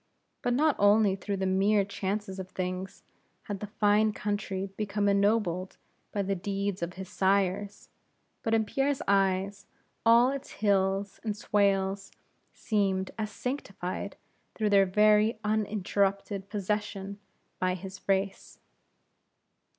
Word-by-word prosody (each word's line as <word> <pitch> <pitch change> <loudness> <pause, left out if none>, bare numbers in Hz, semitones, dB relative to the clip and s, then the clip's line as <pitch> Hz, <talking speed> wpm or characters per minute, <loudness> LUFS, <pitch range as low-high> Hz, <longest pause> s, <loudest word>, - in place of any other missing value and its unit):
But 245 - +1
not 305 +2 +3
only 205 -1 +5
through 200 +1 -3
the 190 - -1
mere 195 +2 +3
chances 195 0 -3
of 185 0 -6
things, 185 0 -4 0.4
had 205 -2 -5
that 210 - -6
fine 210 +1 +4
country 200 -2 -3
become 205 -1 -1
ennobled 200 -3 +1 0.3
by 200 - -1
the 195 +1 0
deeds 195 0 -2
of 170 +1 -3
his 190 0 -7
sires, 195 +1 0 0.5
but 225 0 +1
in 220 -1 +2
Pierre's 275 +4 0
eyes, 195 0 +1 0.4
all 235 +3 +6
its 275 -1 -6
hills 195 -1 +1
and 215 -2 -2
swales 195 -1 +1 0.4
seemed 195 -3 0
as 215 -1 -1
sanctified 200 -6 -4 0.4
through 215 -2 0
their 195 -1 +5
very 210 +3 +4
long 215 0 +1
uninterrupted 200 -1 -1
possession 205 -1 -3 0.4
by 185 0 +1
his 190 +1 -9
race. 195 0 -1
200 Hz, 125 wpm, -29 LUFS, 190-210 Hz, 0.5 s, all